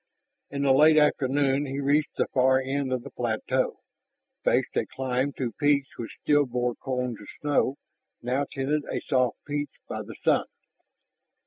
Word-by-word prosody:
In 140 0 -3
the 140 - +4
late 155 +3 +6
afternoon 140 -1 +2
he 135 +1 -3
reached 145 +2 +1
the - - +1
far 130 0 +4
end 135 0 -2
of 125 -2 -1
the 140 - -9
plateau, 125 +2 -1 0.6
faced - - +1
a - - 0
climb 130 +1 -1
to 125 -3 -3
peaks 145 -2 +3
which 115 - -7
still 145 -1 +3
bore 125 0 -1
cones 125 -2 -3
of 105 - -12
snow, 145 -2 +1 0.4
now 130 +4 -1
tinted 145 +3 0
a - - -1
soft 125 -3 +1
peach 145 0 -3
by - - -4
the - - -9
sun. - - +3
135 Hz, 160 wpm, -27 LUFS, 125-145 Hz, 0.6 s, late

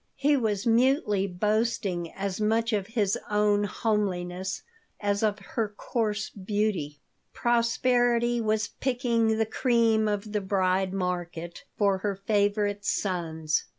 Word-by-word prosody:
He 285 +2 +3
was 220 -5 0
mutely 230 -4 +3
boasting 200 -2 -1
as 195 +1 -3
much 225 +2 +1
of 200 -2 0
his 215 -4 0
own 210 0 +2
homeliness 190 -4 -2 0.4
as 205 -1 0
of 210 -2 +1 0.2
her 220 -3 -1
coarse 215 -2 -2
beauty 195 -7 -2 0.3
Prosperity 240 0 +2
was 215 0 0
picking 235 -4 0
the 220 - +2
cream 225 -2 +2
of 205 0 -2
the 210 -1 -1
"bride 190 -1 +1
market" 175 -2 -4
for 200 -2 +2
her 200 0 -2
favorite 205 0 0
sons. 160 -6 -1
210 Hz, 120 wpm, -27 LUFS, 190-225 Hz, 0.4 s, He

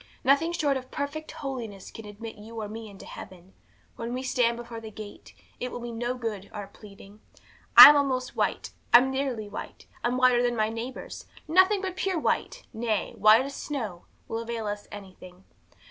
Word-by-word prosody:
Nothing 280 +6 +3
short 290 -5 +1
of 255 0 -9
perfect 295 +3 -5
holiness 235 -9 -6
can 225 - -10
admit 215 +2 -9
you 220 +2 -9
or 215 - -4
me 220 +1 -8
into 195 -1 -12
heaven. 185 0 -11 0.4
When 235 +1 -4
we 255 - -4
stand 240 -2 +1
before 235 -1 -8
the 220 - -8
gate, 210 -1 -11 0.2
it 250 - -4
will - - -6
be 240 0 -6
no 240 +2 -2
good 220 -5 -5
our 210 -2 -6
pleading, 200 +1 -15 0.6
I'm 295 - +13
almost 260 -3 0
white, - - -1 0.2
I'm 255 +2 +7
nearly 265 -5 -2
white, 205 - -8 0.2
I'm 245 +1 0
whiter 255 -1 +4
than 240 0 +1
my 215 -1 +1
neighbours; 230 +3 -7 0.2
nothing 375 +5 +4
but 375 -1 -3
pure 375 -1 -1
white, 315 - -1
nay, 220 -2 -2
white 215 +5 +6
as 280 - -6
snow, 225 -13 -5 0.2
will 225 - -3
avail 230 -1 -4
us 205 0 -5
anything. 185 -2 -12
235 Hz, 180 wpm, -27 LUFS, 210-265 Hz, 0.6 s, I'm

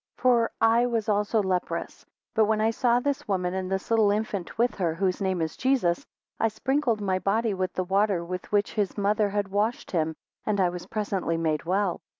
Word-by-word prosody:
19 - - -23
For 240 -2 +4
I 230 +2 +4
was 230 -3 -1
also 210 +1 +1
leprous; 185 -2 -3 0.3
but 220 -1 +4
when 215 0 +1
I 220 +1 +3
saw 240 +1 +2
this 280 +2 -2
woman, 185 -3 0
and 190 0 -3
this 190 +3 -3
little 220 -2 +4
infant 205 -3 -2
with 240 +2 +2
her, 170 -4 0
whose 185 +2 0
name 190 -3 0
is 160 - -4
Jesus, 250 -11 +1 0.3
I 225 - +3
sprinkled 245 0 0
my 190 -2 0
body 210 +4 +1
with 185 -1 -2
the 185 - -1
water 195 -1 +1
with 180 +1 -6
which 205 0 +1
his 205 -3 -1
mother 205 +1 +2
had 200 -1 -1
washed 210 +4 -1
him 160 -2 0 0.3
and 210 -2 0
I 185 -2 +3
was 175 0 -7
presently 200 -6 -1
made 160 -1 -1
well. 190 +1 0
205 Hz, 205 wpm, -26 LUFS, 185-225 Hz, 0.3 s, For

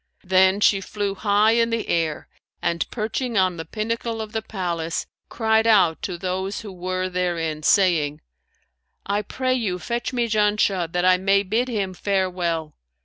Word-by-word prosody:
Then 190 +1 +3
she 195 -1 +4
flew 200 +1 -3
high 205 +2 +3
in 230 0 +2
air 165 -8 -1 0.3
and 170 -1 -1
perching 230 +2 -2
on 185 -2 +2
the 165 - -5
pinnacle 225 +4 -3
of 215 -1 -5
the 220 - -2
palace, 170 -6 -3 0.2
cried 220 -1 +2
out 190 -7 +4
to 180 -3 -4
those 190 +2 -3
who 210 -3 -8
were 185 +1 -2
therein, 170 -4 -2
saying, 155 -5 +3 0.9
'I 200 +1 0
pray 255 +5 -1
you 215 -8 -1
fetch 235 +6 -3
me 240 -2 0
Janshah, 210 -5 +1
that 180 +1 0
I 185 0 +5
may 195 +2 +2
bid 220 +6 0
him 200 -6 -2
farewell.' 180 -5 -1
195 Hz, 155 wpm, -23 LUFS, 180-220 Hz, 0.9 s, I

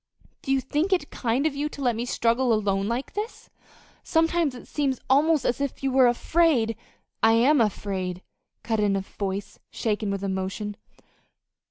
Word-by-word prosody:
"Do 270 - -3
you 270 -1 +3
think 300 +8 -1
it 355 -6 0
kind 245 +4 0
of 310 -3 0
you 295 +2 -1
to 285 - -11
let 245 -3 +2
me 235 +2 -2
struggle 240 +1 +1
along 215 -1 +3 0.2
alone 195 +1 -2
like 235 +4 -3
this? 425 +2 -6 0.5
Sometimes 325 -3 +1
it 245 - -11
seems 275 -4 -1
almost 300 +1 +4
as 245 - 0
if 280 -1 -3
you 270 - +1
were 260 -1 +5
afraid 245 -2 +2 0.2
" - - -47
"I 225 0 +5
am 255 +4 +4
afraid," 190 -4 -2 0.4
cut 225 -1 -1
in 205 -1 +2
a 195 - 0
voice 195 +1 -5
shaken 215 -2 -1
with 200 0 -3
emotion. 195 +2 -3
240 Hz, 180 wpm, -25 LUFS, 210-285 Hz, 0.5 s, were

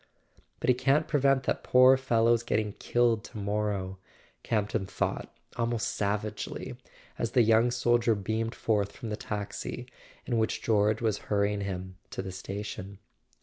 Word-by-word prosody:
"But - - -3
he 125 - +6
can't 135 +5 +2
prevent 135 -2 +3
that - - -1
poor 130 +1 +7
fellow's 120 -3 +3
getting 110 -3 -1
killed 120 -3 +2
to - - -10
morrow," 100 -2 -2 0.4
Campton 105 -2 -1
thought - - -2 0.3
almost 115 -2 0
savagely, 105 +1 -3 0.4
as 115 - -2
the 125 -3 +6
young 115 +2 +4
soldier 120 -1 +2
beamed 110 +3 -2
forth 100 -3 0
from 120 -4 -7
the 105 - -2
taxi 105 +4 -5 0.4
in 120 -3 0
which 110 - -1
George 110 0 +2
was 110 -3 +1
hurrying 100 0 +1
him 95 -1 -5
to - - -5
the 95 - -5
station. 100 +1 -6
110 Hz, 145 wpm, -29 LUFS, 100-120 Hz, 0.4 s, poor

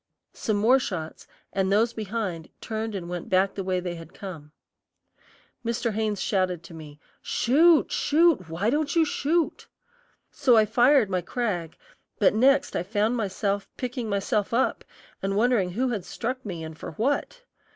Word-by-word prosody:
Some 215 -2 -1
more 240 +6 +5
shots, 165 -10 -5 0.3
and 190 0 0
those 225 +3 +3
behind 205 -7 -4
turned 220 -1 -4
and 175 -3 -5
went 175 -1 -5
back 190 +1 +2
the 195 - -4
way 185 -1 0
they 180 -1 -4
had 165 -1 -11
come. 165 -7 -9 1.1
Mr. 235 -1 -1
Haynes 215 -1 -1
shouted 185 -4 0
to 170 - -12
me, 150 -2 -11 0.2
"Shoot, 315 +6 +4
shoot; 305 - +3
why 185 +8 0
don't 295 +2 0
you 330 -1 +5
shoot!" 315 +3 -1 0.6
So 255 -5 +4
I 215 - +6
fired 240 0 +4
my 185 -1 +1
Krag, 180 -4 -3 0.4
but - - +4
next 270 +6 +3
I - - +1
found 210 +5 0
myself 200 -2 -2
picking 245 -2 -4
myself 205 +2 0
up 260 - +1 0.4
and 195 0 -1
wondering 225 -5 +2
who 255 +6 0
had 215 -6 -2
struck 255 +7 -4
me 175 -6 -6
and 160 0 -7
for 160 - -8
what. 285 - -1
215 Hz, 160 wpm, -26 LUFS, 185-245 Hz, 1.1 s, I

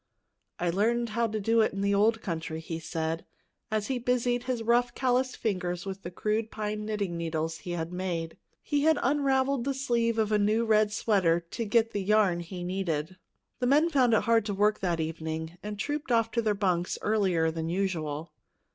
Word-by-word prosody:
"I 175 -1 0
learned 230 +5 +1
how 230 +2 +1
to 215 0 -3
do 225 +3 +3
it 215 - +1
in 195 - -3
the 200 0 +2
old 215 +2 +3
country," 165 -3 -3
he 165 0 -5
said 160 0 -3 0.5
as 215 -2 0
he 260 0 -1
busied 245 0 0
his 250 -3 -2
rough, 240 +1 +2
calloused 255 0 +1
fingers 180 -5 -2
with 195 0 -5
the 175 - -6
crude 215 +4 -1
pine 210 -1 -4
knitting 200 -5 -2
needles 160 -1 -2
he 175 - -5
had 165 0 -4
made. 175 -3 -3 0.3
He 290 -1 0
had 315 +1 +4
unraveled 270 -1 +2
the 275 +1 -1
sleeve 235 -4 0
of 220 -1 +1
a 210 - +3
new 215 +3 +2
red 215 -1 +3
sweater 190 -6 +2
to 230 - -3
get 225 +1 +2
the 205 - -2
yarn 195 -3 +3
he 175 +1 -6
needed. 180 -2 -2 0.4
The 250 - +1
men 300 +6 +4
found 250 -6 +4
it - - +3
hard 230 -1 +3
to 205 -2 -2
work 210 +2 +2
that 175 -3 -1
evening, 160 +1 -4
and 210 0 -5
trooped 290 +3 -3
off 230 -1 +3
to 235 - +1
their 215 -2 +1
bunks 180 -3 0
earlier 185 -7 +2
than 160 0 -3
usual. 165 -4 -2
210 Hz, 200 wpm, -28 LUFS, 175-235 Hz, 0.5 s, had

